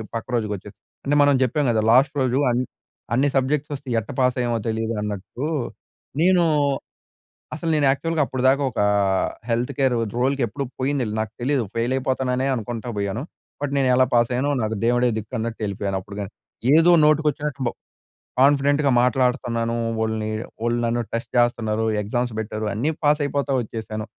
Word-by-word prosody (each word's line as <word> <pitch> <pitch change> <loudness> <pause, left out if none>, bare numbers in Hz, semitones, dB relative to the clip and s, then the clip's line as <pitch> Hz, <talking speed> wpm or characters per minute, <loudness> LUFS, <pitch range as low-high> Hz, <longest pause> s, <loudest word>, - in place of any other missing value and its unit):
పక్క 115 - -4
రోజుకి 110 -3 -1
వచ్చేసి. 95 - -11 0.3
అంటే, 145 - +2
మనం 145 -1 +4
చెప్పాం 135 +4 0
కదా, 110 -1 +1
లాస్ట్ 130 +4 +5
రోజు 130 0 +1
అన్ 120 +1 +1 0.5
అన్ని 135 +4 +3
సబ్జెక్ట్స్ 140 +3 0
అసలు 135 -2 -8
ఎట్టా 110 - -8
పాస్ 125 -1 +3
అయ్యామో 120 -1 0
తెలీదు 110 +1 -1
అన్నట్టు. 105 +5 -5 0.8
నేను 180 0 +4 1.1
అసలు 165 +1 -3
నేను 150 -2 +2
యాక్చువల్‌‌గా 160 +3 0
అప్పటిదాకా 130 +2 +2
ఒక - - -9
ఆ - - +2 0.5
హెల్త్ 120 +4 0
కేర్ 130 -2 +3 0.2
రోల్‌కి 135 +2 +1
ఎప్పుడు 140 +6 -4
పోయిందేలే. 130 -5 -1
నాకు 110 0 -3
తెలీదు 135 0 +1
ఫెయిల్ 115 +2 0
అయిపోతాననే 130 0 0
అనుకుంటా 115 0 -5
పోయాను. 100 +3 -2 0.4
బట్, 145 -1 -2
నేను 135 -1 +2
ఎలా 130 0 +5
పాస్ 120 0 +3
అయ్యానో 130 +4 0
నాకు 110 0 -1
దేవుడే 120 +1 +3
దిక్కు 110 0 -8
అన్నట్టు 115 0 -4
ఎళ్ళిపోయాను 100 -1 -2
అప్పుడుగాని. 100 +1 -7 0.4
ఏదో 165 +2 +6
నోటికి 155 +1 +3
వచ్చినట్టు 145 -1 -5
బ్ - - +2 0.7
కాన్ఫిడెంట్‌గా 140 +1 +4
మాట్లాడుతన్నాను. 125 -2 +1 0.2
వోళ్ళని 110 -1 -1 0.3
వోళ్ళు 120 0 +1
నన్ను 120 +1 0
టెస్ట్ 115 0 -3
చేస్తున్నారు. 115 -2 +1 0.2
ఎగ్జామ్స్ 120 +3 -2
పెట్టారు. 110 0 -4
అన్నీ 125 +10 0
పాస్ 150 +1 +4
అయిపోతా 140 0 -1
వచ్చేసాను. 110 -1 -5
125 Hz, 160 wpm, -23 LUFS, 110-140 Hz, 1.1 s, ఏదో